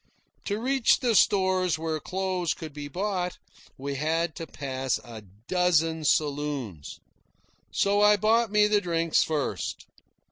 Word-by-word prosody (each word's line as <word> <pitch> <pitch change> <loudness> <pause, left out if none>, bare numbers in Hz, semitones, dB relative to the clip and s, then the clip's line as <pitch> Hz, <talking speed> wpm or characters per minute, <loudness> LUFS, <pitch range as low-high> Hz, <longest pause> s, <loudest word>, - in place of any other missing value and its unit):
To 205 +1 -2
reach 260 0 +2
the 245 -3 +2
stores 185 -4 +3
where 160 -1 -2
clothes 185 -1 -2
could 160 -3 -8
be 145 0 -6
bought, 180 +2 -2 0.4
we 140 +1 -4
had 160 +3 -1
to 165 - -6
pass 130 -2 -2
a 115 -2 -10 0.3
dozen 165 -3 +1
saloons. 145 - -1 0.7
So 200 +1 +2
I 210 0 +6
bought 225 +3 +2
me 210 0 +5
the 210 -1 +2
drinks 165 -2 +1
first. 155 -3 -3
170 Hz, 135 wpm, -27 LUFS, 150-200 Hz, 0.7 s, I